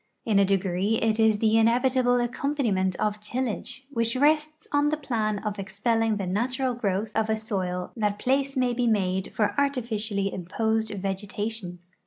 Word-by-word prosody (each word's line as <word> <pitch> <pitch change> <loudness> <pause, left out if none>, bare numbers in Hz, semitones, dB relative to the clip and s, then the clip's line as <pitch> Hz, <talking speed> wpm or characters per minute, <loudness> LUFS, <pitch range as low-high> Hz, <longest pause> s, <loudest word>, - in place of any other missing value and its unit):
In 210 -3 +3
a 200 - +5
degree 195 +2 +1
it 225 0 +1
is 220 -1 +4
the 220 +1 +3
inevitable 245 +2 +3
accompaniment 240 -7 0
of 210 +2 -1
tillage, 250 +3 -4
which 230 -2 -1
rests 305 +3 +1
on 290 0 +3
the 305 - 0
jdan 220 -7 -2
of 205 -1 -3
expelling 220 +3 0
the 195 - -3
natural 250 +7 0
growth 210 -2 -2
of 220 0 +1
a 220 - +3
soil 185 -4 -3
that 210 -3 0
place 270 +3 0
may 250 -1 +2
be 240 0 0
made 190 -3 0
for 210 -2 0
artificially 220 -7 -1
imposed 220 +5 -1
vegetation. 200 -1 -4
220 Hz, 160 wpm, -26 LUFS, 200-245 Hz, -, a